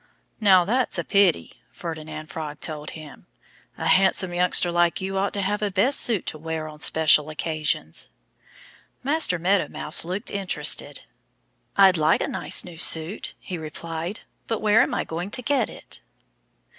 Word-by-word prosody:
"Now, 190 -5 +5
that's 245 +5 +1
a - - -1
pity," 200 -4 +1
Ferdinand 155 -2 -7
Frog 150 -2 -6
told 150 -2 -4
him. 155 -2 -13 0.5
"A - - -5
handsome 185 -1 +3
youngster 175 0 +3
like 175 0 +1
you 190 +1 -4
ought 195 +1 0
to 200 - -2
have 205 +2 -1
a 210 - 0
best 205 +9 +1
suit 225 -7 +2
to 155 - -4
wear 160 0 -4
on 150 -1 -11
special 155 -1 +3
occasions." 155 - -2 0.9
Master 285 - +2
Meadow 185 +4 +1
Mouse - - -1
looked 185 +4 -3
interested. 195 -2 0 0.8
"I'd 190 -2 +6
like 155 +1 +2
a - - -1
nice - - +2
new 170 -2 -11
suit," 165 +6 +3
he 180 -3 -7
replied. 165 +4 -6 0.3
"But 225 - -2
where 215 +1 +4
am - - 0
I - - -1
going 175 +4 -5
to 250 +4 -1
get 285 +3 +1
it?" - - -8
175 Hz, 160 wpm, -23 LUFS, 160-200 Hz, 0.9 s, I'd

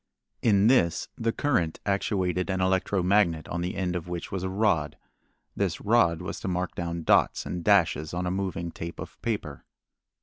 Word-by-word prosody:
In 100 -3 +4
this 110 -9 +3
the 115 0 0
current 115 - 0
actuated 95 -2 0
an 95 0 0
electro 95 0 +1
magnet 90 -5 +2
on 85 - -2
the 90 +2 -3
end 90 -2 -1
of 90 -1 -4
which 90 -1 -5
was 95 - -3
a 95 - -2
rod. 95 -7 +1 0.6
This 95 -5 -1
rod 100 -7 +2
was - - -5
to - - -5
mark 90 -1 -2
down 85 -1 -4
dots - - +3
and 90 -1 -4
dashes 80 -6 +3
on 90 +1 -2
a 90 - -1
moving 90 -3 -3
tape 85 +1 -7
of - - -9
paper. - - -3
90 Hz, 180 wpm, -27 LUFS, 85-100 Hz, 0.6 s, In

